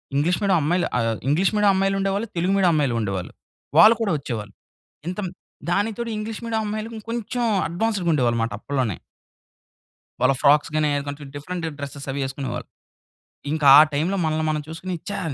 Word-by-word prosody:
English 165 Hz, +5 st, +1 dB
medium 195 Hz, -3 st, +3 dB
అమ్మాయిలు 175 Hz, +4 st, +1 dB
ఆహ్, 115 Hz, -1 st, 0 dB
English 165 Hz, +7 st, +2 dB
medium 210 Hz, -1 st, +4 dB
అమ్మాయిలు 195 Hz, +1 st, +1 dB
ఉండేవాళ్ళు, 195 Hz, +3 st, -1 dB
తెలుగు 180 Hz, +3 st, +1 dB
మీడియం 185 Hz, -3 st, +4 dB
అమ్మాయిలు 140 Hz, -6 st, +1 dB
ఉండేవాళ్ళు. 100 Hz, -4 st, -3 dB, 0.5 s
వాళ్ళు 220 Hz, +2 st, +9 dB
కూడా 210 Hz, -4 st, +1 dB
వచ్చేవాళ్ళు. 110 Hz, -7 st, -6 dB, 0.5 s
ఇంత 180 Hz, +3 st, -4 dB, 0.5 s
దానితోటి 220 Hz, +5 st, -1 dB
ఇంగ్లీష్ 215 Hz, +1 st, -5 dB
మీడియం 225 Hz, -1 st, -1 dB
అమ్మాయిలు 215 Hz, +2 st, -4 dB
కొంచెం 235 Hz, +1 st, -2 dB, 0.2 s
అడ్వాన్స్‌గా 190 Hz, 0 st, -1 dB
ఉండేవాళ్ళు 120 Hz, -5 st, +1 dB
మాట 115 Hz, -, -2 dB
అప్పట్లోనే. 130 Hz, -8 st, -2 dB, 1.2 s
వాళ్ళ -, -, +4 dB
ఫ్రాక్స్ 145 Hz, +1 st, +4 dB
గాని, 155 Hz, -1 st, +2 dB
ఏది 145 Hz, -, -1 dB
కొంచెం 145 Hz, +1 st, -7 dB
డిఫరెంట్ 175 Hz, +4 st, -5 dB
డ్రెసెస్ 140 Hz, 0 st, -7 dB
అవి 140 Hz, -, -3 dB
యేసుకునేవాళ్ళు. 135 Hz, 0 st, -5 dB, 0.9 s
ఇంకా 155 Hz, -2 st, 0 dB
ఆ -, -, +11 dB
టైంలో 170 Hz, +7 st, 0 dB
మనల్ని 155 Hz, 0 st, 0 dB
మనం 150 Hz, -1 st, -1 dB
చూసుకొని 180 Hz, +3 st, -5 dB, 0.2 s
ఛా! -, -, -3 dB
170 Hz, 160 wpm, -23 LUFS, 140-200 Hz, 1.2 s, ఆ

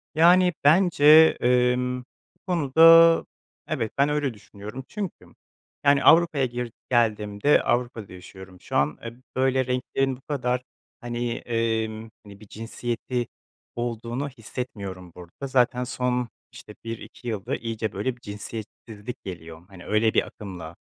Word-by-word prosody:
Yani, 180 Hz, +2 st, +5 dB
bence, 160 Hz, 0 st, +3 dB, 0.4 s
emm, 125 Hz, +1 st, +2 dB
bu 125 Hz, -, -29 dB
konuda, 165 Hz, 0 st, +6 dB, 0.4 s
evet, 120 Hz, -9 st, -2 dB
ben 140 Hz, +1 st, +3 dB
öyle 145 Hz, -4 st, -1 dB
düşünüyorum 105 Hz, +3 st, -10 dB
çünkü, 205 Hz, -5 st, -6 dB, 0.6 s
yani, 140 Hz, 0 st, +4 dB
Avrupa'ya, 165 Hz, -5 st, +5 dB
gir 120 Hz, -1 st, -5 dB, 0.2 s
geldiğimde 110 Hz, +1 st, +2 dB
Avrupa'da 120 Hz, -4 st, -2 dB
yaşıyorum 90 Hz, 0 st, -13 dB
şu -, -, -7 dB
an, 70 Hz, +2 st, +1 dB
e, 115 Hz, -, -5 dB, 0.2 s
böyle 130 Hz, 0 st, +2 dB
renklerin 130 Hz, +1 st, -1 dB
bu 130 Hz, -, -22 dB
kadar, 125 Hz, -4 st, -2 dB, 0.4 s
hani, 120 Hz, 0 st, -3 dB
emm, 115 Hz, -1 st, -2 dB
hani, 100 Hz, -1 st, -14 dB
bir 110 Hz, -, -15 dB
cinsiyeti 120 Hz, +2 st, -4 dB, 0.5 s
olduğunu 120 Hz, +3 st, -3 dB
hissetmiyorum 100 Hz, -7 st, -7 dB
burada, 90 Hz, +10 st, -9 dB
zaten 125 Hz, -1 st, +2 dB
son, 125 Hz, -1 st, -2 dB, 0.2 s
işte, 105 Hz, -, -13 dB
1-2 115 Hz, +1 st, -8 dB
yılda 105 Hz, -4 st, -3 dB
iyice, 115 Hz, -2 st, -4 dB
böyle, 120 Hz, +6 st, -2 dB
bir 120 Hz, -, -26 dB
cinsiyetsizlik 110 Hz, +1 st, -8 dB
geliyor, 85 Hz, -3 st, -9 dB
hani, 95 Hz, -3 st, -13 dB
öyle 110 Hz, +1 st, +2 dB
bir -, -, +2 dB
akımla, 90 Hz, -5 st, -9 dB
120 Hz, 130 wpm, -25 LUFS, 105-130 Hz, 0.6 s, konuda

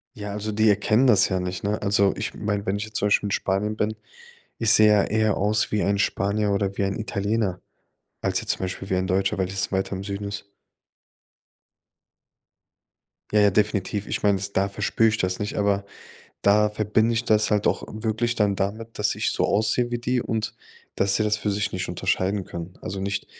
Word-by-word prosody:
Ja, 105 Hz, -1 st, -6 dB
also 105 Hz, +1 st, -3 dB
die 110 Hz, +1 st, +2 dB
erkennen 110 Hz, +5 st, +3 dB
das 105 Hz, -6 st, +5 dB
ja 95 Hz, -, 0 dB
nicht, 90 Hz, 0 st, -4 dB
ne? 105 Hz, +1 st, -1 dB
Also, 100 Hz, -1 st, +3 dB
ich 105 Hz, +1 st, -3 dB
meine, 105 Hz, -1 st, -2 dB
wenn 95 Hz, -, 0 dB
ich 100 Hz, -, -3 dB
jetzt 110 Hz, 0 st, -4 dB
zum -, -, 0 dB
Beispiel 105 Hz, 0 st, +2 dB
in -, -, -4 dB
Spanien 100 Hz, +2 st, 0 dB
bin 110 Hz, 0 st, -1 dB, 0.6 s
ich 115 Hz, -2 st, +3 dB
sehe 110 Hz, 0 st, +6 dB
ja 105 Hz, -2 st, +4 dB
eher 110 Hz, -1 st, +1 dB
aus 105 Hz, +2 st, +1 dB
wie 105 Hz, -, 0 dB
ein 100 Hz, 0 st, +1 dB
Spanier 100 Hz, +1 st, 0 dB
oder 100 Hz, -1 st, -1 dB
wie 100 Hz, -, +2 dB
ein 95 Hz, 0 st, -2 dB
Italiener 105 Hz, -3 st, -1 dB, 0.6 s
als -, -, 0 dB
jetzt -, -, -6 dB
zum -, -, -4 dB
Beispiel 95 Hz, +1 st, -5 dB
wie -, -, +2 dB
ein 95 Hz, 0 st, 0 dB
Deutscher, 95 Hz, +1 st, 0 dB
weil 95 Hz, -, 0 dB
es 95 Hz, +1 st, -3 dB
weiter 95 Hz, 0 st, -1 dB
im 95 Hz, -, -6 dB
Süden 100 Hz, 0 st, -4 dB
ist. 100 Hz, 0 st, -6 dB, 2.9 s
Ja, 105 Hz, -, +4 dB
ja, 105 Hz, -1 st, +6 dB
definitiv. 105 Hz, 0 st, 0 dB
Ich -, -, -3 dB
meine 100 Hz, -1 st, +4 dB
es 100 Hz, +1 st, -5 dB
da 100 Hz, 0 st, +1 dB
verspür 115 Hz, +3 st, +1 dB
ich 110 Hz, 0 st, +1 dB
das 95 Hz, -2 st, -1 dB
nicht, 105 Hz, 0 st, -3 dB
aber 100 Hz, -1 st, +1 dB, 0.6 s
da 105 Hz, +1 st, +4 dB
verbinde 110 Hz, +2 st, +1 dB
ich 115 Hz, +1 st, -1 dB
das 110 Hz, -1 st, +2 dB
halt 105 Hz, -1 st, +1 dB
auch -, -, +1 dB
wirklich 110 Hz, +2 st, -1 dB
dann 105 Hz, -3 st, +1 dB
damit, 110 Hz, +4 st, -4 dB
dass 105 Hz, 0 st, +1 dB
ich -, -, 0 dB
so -, -, 0 dB
aussehe 110 Hz, +4 st, +1 dB
wie 120 Hz, -, -1 dB
die 125 Hz, +1 st, 0 dB
und 110 Hz, -2 st, -3 dB, 0.4 s
dass 100 Hz, 0 st, +1 dB
sie -, -, +1 dB
das 105 Hz, 0 st, +1 dB
für 105 Hz, 0 st, -2 dB
sich 105 Hz, +1 st, -1 dB
nicht 95 Hz, 0 st, -3 dB
unterscheiden 95 Hz, +2 st, -1 dB
können. 85 Hz, +1 st, -8 dB
Also 95 Hz, -, -4 dB
nicht 100 Hz, 0 st, -3 dB
105 Hz, 210 wpm, -24 LUFS, 100-110 Hz, 2.9 s, sehe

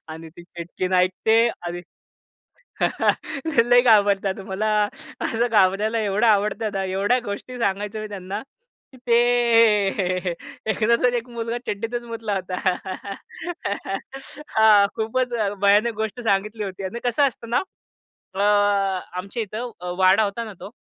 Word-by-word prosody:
आणि 160 Hz, +1 st, -8 dB
ती 175 Hz, -, -11 dB
चिटकीन 175 Hz, +2 st, -5 dB
ऐकते 220 Hz, +6 st, +3 dB
आणि 175 Hz, 0 st, -5 dB, 1.7 s
ते 240 Hz, -7 st, +2 dB
लय 245 Hz, 0 st, +7 dB
घाबरतात. 200 Hz, -4 st, +3 dB
मला 205 Hz, +3 st, -1 dB, 0.5 s
असं 230 Hz, +2 st, 0 dB
घाबरवायला 215 Hz, +1 st, +2 dB
एवढं 210 Hz, +1 st, +1 dB
आवडतं 210 Hz, +1 st, +2 dB
ना. 195 Hz, -, -1 dB
एवढ्या 195 Hz, +6 st, +1 dB
गोष्टी 205 Hz, +5 st, -6 dB
सांगायचो 205 Hz, +1 st, -1 dB
मी 215 Hz, -, -5 dB
त्यांना, 195 Hz, -1 st, -5 dB, 0.5 s
की 260 Hz, -, -16 dB
ते 235 Hz, 0 st, +5 dB, 1.5 s
एकदाच 235 Hz, +2 st, +1 dB
एक 240 Hz, 0 st, -3 dB
मुलगा 235 Hz, 0 st, -3 dB
चड्डीतच 230 Hz, +4 st, -3 dB
मुतला 225 Hz, -2 st, -4 dB
होता, 185 Hz, -1 st, -3 dB, 2.0 s
हा 215 Hz, -2 st, +7 dB
खूपच 245 Hz, +3 st, -1 dB, 0.3 s
भयानक 205 Hz, +3 st, +4 dB
गोष्ट 220 Hz, +2 st, -3 dB
सांगितली 210 Hz, 0 st, 0 dB
होती. 195 Hz, 0 st, -6 dB
अन् 190 Hz, +5 st, -4 dB
कसं 250 Hz, +4 st, +3 dB
असतं 235 Hz, -3 st, -8 dB
ना 240 Hz, -, +2 dB, 0.7 s
अ, 195 Hz, -, -3 dB, 0.8 s
आमच्या 200 Hz, +5 st, -4 dB
इथं 220 Hz, +4 st, -5 dB
अ, 180 Hz, 0 st, -5 dB
वाडा 190 Hz, +3 st, +5 dB
होता 205 Hz, +3 st, -3 dB
ना 220 Hz, -, -8 dB
तो, 205 Hz, -, -8 dB
215 Hz, 130 wpm, -23 LUFS, 195-230 Hz, 2.0 s, लय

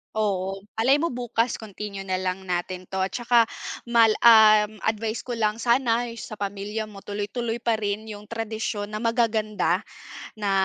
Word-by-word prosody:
Oo, 195 Hz, -2 st, -1 dB, 0.2 s
malay 260 Hz, +5 st, +5 dB
mo 335 Hz, -, 0 dB
bukas 240 Hz, -1 st, -1 dB
continue 205 Hz, -2 st, -7 dB
na 185 Hz, -, 0 dB
lang 185 Hz, +1 st, -3 dB
natin 180 Hz, +1 st, -3 dB
'to 190 Hz, 0 st, -1 dB
at 190 Hz, -, -2 dB
tsaka 240 Hz, -1 st, +4 dB, 0.4 s
mal 230 Hz, -2 st, +4 dB
um, 215 Hz, -2 st, +7 dB
advice 220 Hz, +1 st, -1 dB
ko 245 Hz, -, -5 dB
lang 215 Hz, -1 st, 0 dB
sana 240 Hz, 0 st, +2 dB
sa 215 Hz, -2 st, -8 dB
pamilya 205 Hz, +2 st, -3 dB
mo, 200 Hz, -2 st, -12 dB
tuloy 205 Hz, 0 st, -4 dB
tuloy 235 Hz, +1 st, -3 dB
pa 230 Hz, -1 st, +1 dB
rin 210 Hz, 0 st, -3 dB
yung 210 Hz, -1 st, -8 dB
tradisyon 220 Hz, -1 st, -4 dB
na 215 Hz, +2 st, -5 dB
magaganda, 225 Hz, -2 st, +1 dB, 0.5 s
na 205 Hz, -2 st, -1 dB
215 Hz, 165 wpm, -25 LUFS, 205-230 Hz, 0.5 s, um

